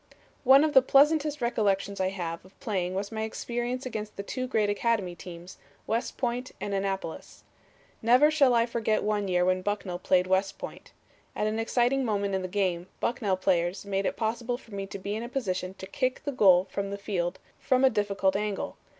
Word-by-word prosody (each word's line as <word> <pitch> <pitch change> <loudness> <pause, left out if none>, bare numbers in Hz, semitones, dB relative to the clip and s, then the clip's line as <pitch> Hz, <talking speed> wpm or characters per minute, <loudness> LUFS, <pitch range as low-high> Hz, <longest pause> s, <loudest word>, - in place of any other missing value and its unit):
"One 270 +2 +7
of 310 -1 +1
the 265 - +8
pleasantest 295 +3 +3
recollections 200 -4 0
I 185 0 +1
have 170 -3 -5
of 185 +1 -20
playing 185 -7 -2
was 200 +2 -3
my 220 -1 -3
experience 240 +3 -3
against 215 -4 -5
the 200 - -5
two 255 +5 -4
great 220 -5 +1
academy 205 -3 0
teams, 175 0 -10 0.3
West 230 +2 -2
Point 245 0 -2
and 200 - -3
Annapolis. 195 -4 -4 0.6
"Never 250 +7 +5
shall 280 -5 +4
I 230 0 +4
forget 225 -2 0
one 210 -1 0
year 180 -1 +2
when 185 0 +2
Bucknell 195 -3 -3
played 180 0 +3
West 190 +1 +1
Point. - - -9 0.4
At - - 0
an 215 +1 -1
exciting 245 +4 +1
moment 200 -4 -1
in 190 - 0
the 185 - -3
game, 180 -2 -1
Bucknell 210 -6 0
players 185 0 0
made 195 -1 -1
it - - -3
possible 235 +2 -1
for 230 -4 -16
me 195 0 -4
to 200 - -6
be 200 +2 -4
in 220 - -3
a 235 - -6
position 190 -7 -3
to 190 - -8
kick 255 +6 -2
the 290 - -2
goal 190 -7 +5
from 200 0 -2
the 200 - -4
field 185 -3 -2 0.2
from 260 0 +3
a - - +7
difficult 200 -3 +1
angle. 210 0 -2
205 Hz, 200 wpm, -28 LUFS, 190-240 Hz, 0.6 s, the